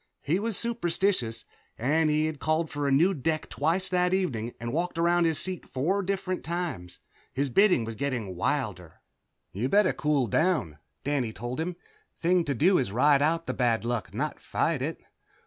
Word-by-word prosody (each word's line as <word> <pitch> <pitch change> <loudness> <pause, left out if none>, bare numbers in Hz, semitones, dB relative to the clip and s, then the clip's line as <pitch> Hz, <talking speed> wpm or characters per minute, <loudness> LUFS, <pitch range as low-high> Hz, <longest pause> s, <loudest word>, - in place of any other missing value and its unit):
He 165 +6 +1
was 220 -2 -2
superstitious, 185 - -1 0.3
and 155 +6 +2
he 155 +1 +2
had 155 -2 -3
called 155 +1 0
for 145 -1 -2
a - - +1
new 170 +8 +4
deck 155 0 -1
twice 170 +6 0
that 180 0 +2
evening 120 - -2
and 115 +1 -4
walked 175 +1 -1
around 170 +1 +3
his 160 -2 +1
seat 185 +1 -2
four 175 +10 0
different 190 -1 -2
times. 165 - -4 0.3
His 135 0 -1
bidding 185 - +4
was 115 - -5
getting 120 -7 -3
wilder. - - -2 0.5
"You'd 115 +7 -2
better 205 +2 +4
cool 150 -4 +1
down," 120 - 0 0.2
Danny 135 -5 0
told 120 +6 -5
him. 170 +2 -2 0.4
"Thing 175 +1 +3
to 140 -3 -1
do 180 +9 +4
is 125 -7 -1
ride 140 +5 +4
out 165 +3 +1
the - - -2
bad 115 -3 +1
luck, 115 -7 -2
not 140 +9 -3
fight 160 -5 -1
it." 155 +5 -2
155 Hz, 180 wpm, -27 LUFS, 125-180 Hz, 0.5 s, new